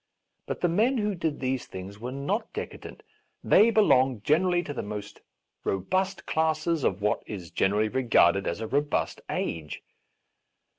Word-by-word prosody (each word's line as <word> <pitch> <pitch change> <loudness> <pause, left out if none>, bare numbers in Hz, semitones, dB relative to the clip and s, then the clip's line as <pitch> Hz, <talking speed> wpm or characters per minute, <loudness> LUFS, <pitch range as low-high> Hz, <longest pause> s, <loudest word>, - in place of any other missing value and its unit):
But - - -4
the 175 - +3
men 220 +10 +2
who 210 -2 0
did 160 -4 -2
these 130 -1 -2
things 95 +2 -8
were 120 +3 -5
not 140 - -2
decadent; - - -7 0.4
they 220 - +6
belonged 135 - +3
generally 175 +3 +2
to 145 - -5
the - - -3
most 105 0 -7 0.4
robust 185 - -1
classes 160 0 0
of 100 +1 0
what 105 - +1
is 95 -6 -7
generally 105 +3 +2
regarded 105 -6 +3
as 85 - -2
a 110 - -3
robust 145 +3 -1
age. 80 -3 -4
135 Hz, 150 wpm, -27 LUFS, -, 0.4 s, they